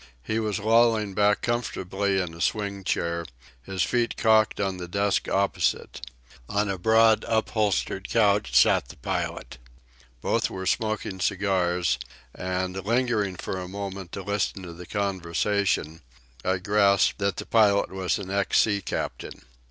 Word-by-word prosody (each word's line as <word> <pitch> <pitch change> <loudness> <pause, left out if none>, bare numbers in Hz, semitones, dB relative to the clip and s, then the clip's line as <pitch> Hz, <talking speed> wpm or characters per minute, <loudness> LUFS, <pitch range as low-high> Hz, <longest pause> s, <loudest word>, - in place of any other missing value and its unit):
He 110 - -1
was 105 -3 -1
lolling 110 -1 +3
back 105 +1 +2
comfortably 100 -5 -1
in 90 -3 -3
a 85 - -9
swing 100 -1 -1
chair, 85 -2 -1 0.4
his 95 +6 -2
feet 120 -1 0
cocked 110 -1 +3
on 95 -2 -1
the 90 -1 -6
desk 100 +2 0
opposite. 100 -8 0 0.5
On 105 +1 +1
a 95 - -4
broad, 110 +2 +4
upholstered 110 -3 0
couch 105 - +2
sat - - +4
the - - -12
pilot. - - -4 0.6
Both - - 0
were 95 0 -6
smoking 110 -2 -1
cigars; 90 -6 +1 0.3
and, 90 +1 -3
lingering 115 -3 0
for 95 +1 -4
a 90 - -6
moment 95 -2 -6
to 100 - -5
listen 100 -1 -2
to 85 -2 -8
the 90 +1 -11
conversation, 95 -3 -1 0.4
I 95 0 +1
grasped 100 +1 +3
that 100 -1 0
the - - -6
pilot 105 -3 +3
was 95 -1 -1
an 95 -2 -7
ex 100 0 +1
sea 100 -2 +3
captain. - - -5
100 Hz, 145 wpm, -26 LUFS, 95-105 Hz, 0.6 s, broad